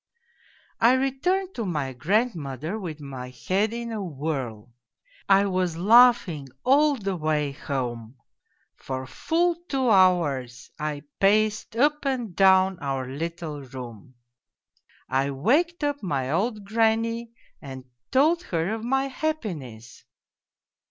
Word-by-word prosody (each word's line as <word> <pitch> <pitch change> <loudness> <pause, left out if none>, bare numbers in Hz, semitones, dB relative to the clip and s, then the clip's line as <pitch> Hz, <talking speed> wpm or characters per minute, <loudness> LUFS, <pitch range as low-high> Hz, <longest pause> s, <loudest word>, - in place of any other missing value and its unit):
" - - -32
I - - +5
returned 345 +9 0
to 235 - -3
my 150 -9 -2
grandmother 165 - -1
with 165 -6 -6
my 130 -3 -7
head 185 - -1
in 235 0 -5
a 220 -2 -3
whirl. 135 - -5 0.6
I 195 +1 +5
was 185 -4 -1
laughing 205 - +5 0.2
all 290 +3 +4
the 195 -6 -3
way 155 -3 0
home; 125 -4 -4 0.6
for 130 0 -5
full 335 - 0
two 265 -4 +1
hours 150 - +2
I 150 -1 -3 0.2
paced 215 +2 +2
up 295 +5 +2
and 245 - -2
down 190 -1 +4
our 135 -3 -3
little 160 +1 -5
room. 125 -3 -10 0.9
I 135 +1 0
waked 295 - +1
up 290 -1 -1
my 140 -8 -2
old 210 +5 -1
granny 225 +2 0 0.3
and 130 -2 -9 0.2
told 315 +6 +3
her 170 +4 -1
of 225 0 -5
my 270 +3 +1
happiness. 170 - -5
185 Hz, 125 wpm, -25 LUFS, -, 0.9 s, I